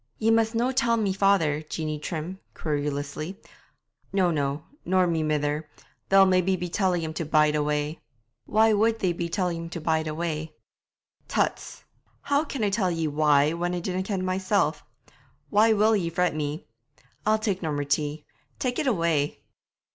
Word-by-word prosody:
'Ye 225 +1 +2
must 225 0 +2
no 240 +3 +1
tell 235 -3 +2
my 205 -4 0
father, 190 -7 +2
Jeanie 155 -1 -4
Trim' 165 +4 -5 0.2
querulously. 145 +3 -3 0.7
'No, 185 -3 +2
no; 145 -1 -1 0.2
nor 185 0 +3
my 165 -2 0
mither. 150 0 -1 0.4
They'll 195 0 +7
maybe 185 0 +3
be 180 -1 -4
telling 180 -2 +1
him 160 0 -4
to 165 - -3
bide 150 -1 +3
away.' 150 +1 -1 0.5
'Why 220 +1 +4
would 220 +2 +2
they 185 -5 0
be 170 0 -3
telling 180 -2 -1
him - - -8
to 170 - -5
bide 160 0 0
away?' 155 0 -3 0.7
'Tuts! - - -2 0.4
How 285 +1 +2
can 275 -6 -4
I 205 - +1
tell 195 -2 +1
ye 165 -2 -1
why, 150 0 +3
when 175 +1 -2
I - - -2
dinna 185 +1 -2
ken 190 -1 -2
mysel'? 190 +2 +1 0.8
Why 215 +2 +5
will 215 +1 +4
ye 175 -5 0
fret 180 0 +1
me? 150 +1 -3 0.6
I'll 215 +1 +3
tak' 205 -4 -2
no 160 -3 -2
more 145 0 -1
tea. 145 +1 -1 0.3
Tak' 250 -1 -2
it 300 - 0
away!' 165 - 0
170 Hz, 170 wpm, -26 LUFS, 155-200 Hz, 0.8 s, They'll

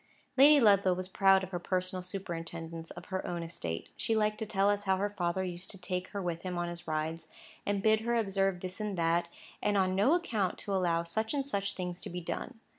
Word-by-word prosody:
Lady 285 +3 +8
Ludlow 200 -5 +5
was 185 0 -2
proud 195 0 +4
of 185 - -6
her 175 - -2
personal 185 +1 -1
superintendence 165 -3 -5
of - - -9
her 190 - -1
own 170 -1 -3
estate. 85 - -5
She 225 - 0
liked 215 0 +1
to 220 - -3
tell 195 -1 +2
us 205 0 -2
how 190 -1 +3
her 205 +2 -1
father 185 -1 -1
used 180 0 -6
to 195 - -6
take 180 0 -3
her 200 - -5
with 175 -3 -2
him 180 -1 -4
in 175 0 -1
his 170 -1 -7
rides, 160 +1 -2 0.4
and 200 -1 0
bid 220 0 +5
her 235 +1 0
observe 195 -4 +1
this 185 +2 -5
and 210 -3 -2
that, 170 +1 +2 0.3
and 205 -1 +2
on 185 -1 +2
no 210 - +4
account 220 - 0
to 200 - -3
allow 170 -3 +2
such 220 - -1
and 275 -1 0
such 200 -7 -1
things 180 -1 -4
to - - -5
be 180 - -4
done. 225 +7 -5
185 Hz, 230 wpm, -31 LUFS, 175-205 Hz, 0.4 s, Lady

